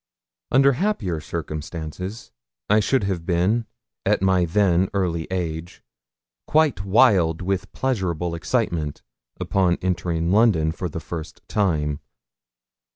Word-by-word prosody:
Under 135 Hz, +2 st, +5 dB
happier 125 Hz, -, -1 dB
circumstances 80 Hz, +6 st, -6 dB, 0.4 s
I 105 Hz, -, +6 dB
should 120 Hz, +3 st, +1 dB
have 95 Hz, -4 st, -2 dB
been, 95 Hz, +7 st, +1 dB, 0.4 s
at -, -, +1 dB
my 95 Hz, -2 st, +3 dB
then 90 Hz, 0 st, +2 dB
early 85 Hz, -4 st, -1 dB
age, 85 Hz, -2 st, -4 dB, 0.6 s
quite 150 Hz, -9 st, +2 dB
wild 95 Hz, -5 st, +4 dB
with 95 Hz, +1 st, -2 dB
pleasurable 90 Hz, -10 st, -1 dB
excitement 85 Hz, -, -1 dB, 0.5 s
on 90 Hz, -3 st, +3 dB
entering 85 Hz, -2 st, 0 dB
London 100 Hz, -7 st, +4 dB
for 90 Hz, +2 st, -4 dB
the 80 Hz, -, -5 dB
first 80 Hz, -2 st, -8 dB
time. 75 Hz, -8 st, 0 dB
90 Hz, 110 wpm, -23 LUFS, 80-105 Hz, 0.6 s, I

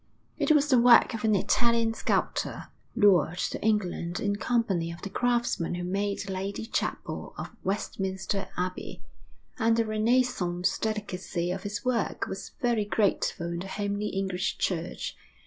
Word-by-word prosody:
It -, -, +1 dB
was 295 Hz, -2 st, +5 dB
the 255 Hz, -3 st, +6 dB
work 240 Hz, +1 st, +7 dB
of 225 Hz, -, -4 dB
an 215 Hz, -1 st, +4 dB
Italian 230 Hz, +2 st, +2 dB
sculptor, -, -, -1 dB, 0.3 s
lured 185 Hz, -7 st, +4 dB
to -, -, -2 dB
England 185 Hz, -5 st, 0 dB
in 205 Hz, -1 st, 0 dB
company 205 Hz, -8 st, 0 dB
of 170 Hz, -, -10 dB
the 200 Hz, -, -5 dB
craftsmen 240 Hz, -8 st, 0 dB
who 175 Hz, -, -4 dB
made 200 Hz, +3 st, -1 dB
the 195 Hz, -, -4 dB
lady 195 Hz, +3 st, -3 dB
chapel -, -, -3 dB
of -, -, -6 dB
Westminster 195 Hz, 0 st, -2 dB
Abbey; 180 Hz, +1 st, -4 dB, 0.6 s
and 225 Hz, -1 st, +3 dB
the 230 Hz, -, +2 dB
renaissance 215 Hz, -5 st, +1 dB
delicacy 190 Hz, -5 st, -2 dB
of 190 Hz, +2 st, -4 dB
its 210 Hz, +4 st, -5 dB
work 250 Hz, -2 st, 0 dB
was -, -, -7 dB
very 235 Hz, -4 st, +2 dB
grateful 200 Hz, -3 st, +1 dB
in 170 Hz, 0 st, -3 dB
the 190 Hz, -, -5 dB
homely 205 Hz, +1 st, -2 dB
English 190 Hz, -1 st, -1 dB
church. 170 Hz, -1 st, -2 dB
205 Hz, 150 wpm, -28 LUFS, 185-225 Hz, 0.6 s, work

